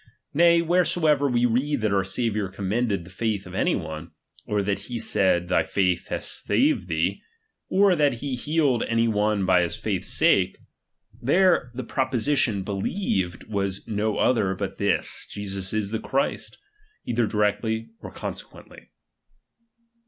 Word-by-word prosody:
Nay, 170 Hz, +2 st, +5 dB
wheresoever 160 Hz, -4 st, +2 dB
we 120 Hz, -1 st, +2 dB
read 125 Hz, +3 st, 0 dB
that 110 Hz, -2 st, +1 dB
our 95 Hz, -1 st, +2 dB
Saviour 105 Hz, 0 st, -1 dB
commended 100 Hz, +1 st, -1 dB
the 90 Hz, -, -14 dB
faith 105 Hz, 0 st, -2 dB
of 90 Hz, -, -10 dB
any 95 Hz, -, +1 dB
one, 80 Hz, -1 st, -6 dB, 0.3 s
or 105 Hz, -1 st, 0 dB
that 100 Hz, 0 st, 0 dB
he 120 Hz, -, -4 dB
said, 95 Hz, -5 st, +1 dB
thy 90 Hz, -2 st, +3 dB
faith 90 Hz, +2 st, 0 dB
hath -, -, -3 dB
saved 90 Hz, -, 0 dB
thee, 85 Hz, +3 st, -1 dB, 0.5 s
or 195 Hz, -1 st, +4 dB
that 145 Hz, -4 st, +3 dB
he 135 Hz, +3 st, -4 dB
healed 145 Hz, -1 st, +1 dB
any 115 Hz, 0 st, +1 dB
one 105 Hz, -2 st, +1 dB
for 90 Hz, -1 st, +4 dB
his 85 Hz, +1 st, 0 dB
faith's 105 Hz, -4 st, -3 dB
sake; -, -, +3 dB, 0.6 s
there 170 Hz, -1 st, +3 dB
the 130 Hz, -, -4 dB
proposition 130 Hz, -4 st, 0 dB
believed 95 Hz, -, -2 dB
was 100 Hz, -2 st, -3 dB
no 110 Hz, -1 st, -1 dB
other 105 Hz, -7 st, +2 dB
but -, -, -5 dB
this, -, -, -1 dB
Jesus 100 Hz, -2 st, -4 dB
is 105 Hz, -2 st, -1 dB
the 110 Hz, -, -1 dB
Christ, 135 Hz, +4 st, -2 dB, 0.5 s
either 120 Hz, -1 st, +1 dB
directly 105 Hz, +2 st, -1 dB
or -, -, -9 dB
conse -, -, -5 dB
quently. -, -, -16 dB
110 Hz, 150 wpm, -25 LUFS, 95-130 Hz, 0.6 s, Nay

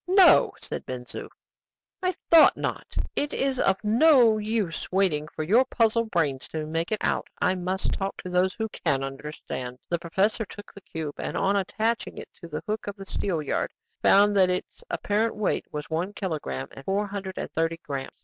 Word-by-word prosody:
"No!" 375 Hz, 0 st, +6 dB
said -, -, -5 dB
Ben 125 Hz, -1 st, -5 dB
Zoof. -, -, -8 dB, 0.7 s
"I 370 Hz, -1 st, 0 dB, 0.2 s
thought 330 Hz, -2 st, +8 dB
not; -, -, -4 dB, 0.2 s
it 290 Hz, 0 st, -1 dB
is 270 Hz, -1 st, 0 dB
of 195 Hz, -, +3 dB
no 235 Hz, 0 st, +5 dB
use 210 Hz, -6 st, -2 dB
waiting 180 Hz, -6 st, +2 dB
for 155 Hz, -, -5 dB
your 220 Hz, +11 st, +5 dB
puzzle 230 Hz, -2 st, +2 dB
brains 155 Hz, -10 st, -1 dB
to 155 Hz, -1 st, -4 dB
make 165 Hz, +4 st, -2 dB
it 215 Hz, -, +2 dB
out. -, -, 0 dB
I 185 Hz, -, +3 dB
must 185 Hz, +1 st, -2 dB
talk 195 Hz, 0 st, -3 dB
to 185 Hz, -, -5 dB
those 180 Hz, +1 st, +2 dB
who 220 Hz, -1 st, -2 dB
can 135 Hz, -8 st, -1 dB
understand." 135 Hz, -2 st, -6 dB
The 170 Hz, -, 0 dB
professor 195 Hz, +7 st, +1 dB
took 205 Hz, 0 st, -11 dB
the 200 Hz, -, -12 dB
cube, 155 Hz, -5 st, -6 dB
and, -, -, -3 dB
on 195 Hz, +1 st, +2 dB
attaching 220 Hz, +4 st, -1 dB
it -, -, -8 dB
to 170 Hz, -, -8 dB
the 150 Hz, -2 st, -5 dB
hook 215 Hz, 0 st, -3 dB
of 200 Hz, -, -4 dB
the 195 Hz, -2 st, -9 dB
steelyard, 165 Hz, -7 st, -1 dB, 0.3 s
found 205 Hz, +1 st, +5 dB
that 185 Hz, -1 st, +5 dB
its 180 Hz, 0 st, -3 dB
apparent 215 Hz, +2 st, 0 dB
weight 210 Hz, -2 st, 0 dB
was 150 Hz, 0 st, -5 dB
one 175 Hz, +5 st, -1 dB
kilogramme 160 Hz, -9 st, -4 dB
and 135 Hz, -, -11 dB
four 200 Hz, +4 st, 0 dB
hundred 195 Hz, -2 st, -6 dB
and -, -, -4 dB
thirty 165 Hz, +1 st, 0 dB
grammes. 135 Hz, -2 st, -5 dB
190 Hz, 190 wpm, -26 LUFS, 160-215 Hz, 0.7 s, thought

